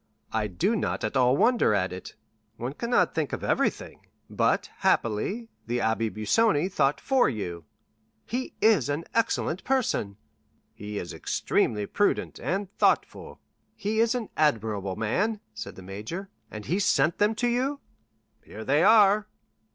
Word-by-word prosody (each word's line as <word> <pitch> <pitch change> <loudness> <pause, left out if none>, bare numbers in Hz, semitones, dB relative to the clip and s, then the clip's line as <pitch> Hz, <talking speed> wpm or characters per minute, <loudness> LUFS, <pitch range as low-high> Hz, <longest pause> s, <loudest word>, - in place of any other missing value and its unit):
"I 110 -1 0
do 100 - 0
not 210 - -2
at - - -2
all 130 0 +4
wonder 240 - +3
at 90 -2 0
it—one 110 +6 -9
cannot 235 -1 +1
think 155 -3 -2
of - - -4
everything; - - -1 0.2
but, - - +1
happily, 190 - 0 0.2
the 120 +1 -1
Abbé 110 -1 0
Busoni 175 - +2
thought 140 -4 +1
for 265 -2 +2
you." 90 - -5 0.6
"He 255 +2 -4
is 210 - +4
an 145 +3 -1
excellent 225 -6 0
person." 230 - 0 0.6
"He 105 0 -7
is 85 - -5
extremely 105 -2 0
prudent 205 - 0
and 195 +2 -3
thoughtful." - - 0 0.3
"He 215 +2 -2
is 230 +2 +3
an 235 -4 -3
admirable 110 -9 0
man," 195 - 0
said 110 - -7
the 95 - -11
major; 110 - -6 0.2
"and 105 -1 -8
he 180 +5 0
sent 175 -4 +2
them 210 +2 +3
to 245 +2 0
you?" 260 +4 0 0.6
"Here 110 +1 -9
they 145 +3 +3
are." 210 -1 +5
150 Hz, 145 wpm, -27 LUFS, -, 0.6 s, are